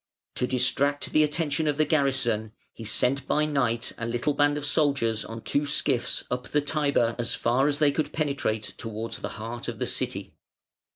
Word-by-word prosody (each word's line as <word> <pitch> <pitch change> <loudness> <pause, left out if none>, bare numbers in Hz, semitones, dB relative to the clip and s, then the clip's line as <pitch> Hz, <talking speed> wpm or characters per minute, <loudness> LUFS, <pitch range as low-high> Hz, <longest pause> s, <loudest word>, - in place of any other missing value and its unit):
To 125 - +1
distract 135 +3 +1
the 155 - +5
attention 150 0 0
of 145 -1 +1
the 155 - +3
garrison 125 -8 +1 0.2
he 115 - -9
sent 125 +5 0
by 150 - +2
night 125 -5 0
a 115 - -2
little 120 +5 0
band 145 +1 +2
of 145 - -3
soldiers 140 -7 +2
on 115 0 -8
two 145 - +1
skiffs 140 -3 +1
up 125 0 -2
the 150 - +1
Tiber 140 -6 +1
as 120 - 0
far 125 +4 +2
as 145 -1 +1
they 150 -1 +4
could 155 +2 -2
penetrate 140 -8 -1
towards 115 +1 -4
the - - -4
heart 115 +2 -6
of - - -4
the - - -1
City. - - -2
140 Hz, 185 wpm, -26 LUFS, 115-145 Hz, 0.2 s, the